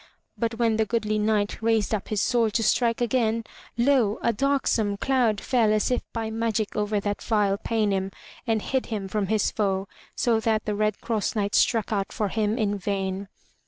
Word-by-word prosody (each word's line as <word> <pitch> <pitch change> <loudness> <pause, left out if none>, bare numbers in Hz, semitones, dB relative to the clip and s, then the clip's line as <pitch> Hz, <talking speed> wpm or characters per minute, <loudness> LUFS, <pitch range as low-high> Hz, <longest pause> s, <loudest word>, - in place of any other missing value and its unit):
But 230 -1 -2
when 225 -2 +1
the 220 - +2
goodly 215 -1 0
Knight 210 -1 0
raised 225 -1 +1
up 210 - -2
his 215 - -1
sword 230 -4 +2
to 225 - +1
strike 235 +1 +2
again, 230 -2 +1 0.3
lo! 240 -4 +3
a 235 - +2
darksome 225 -5 +1
cloud 245 -4 +1
fell 230 -2 +2
as 215 +4 +2 0.2
by 225 -1 -3
magic 225 -1 -1
over 210 -1 0
that 205 0 -3
vile 205 -3 +1
Paynim 205 -4 0 0.4
and 220 -2 +1
hid 265 -1 -1
him 210 -4 -3
from 200 0 -1
his 215 0 +1
foe, 195 -2 -1 0.3
so 230 -2 +2
that 220 -1 0
the 210 - -1
Red 210 0 -1
Cross 225 -2 -1
Knight 205 -1 -1
struck 225 -2 +2
out 195 -2 -1
for 210 -2 -1
him 215 +2 0
in 205 -3 0
vain. 195 0 -2
215 Hz, 185 wpm, -25 LUFS, 205-230 Hz, 0.4 s, lo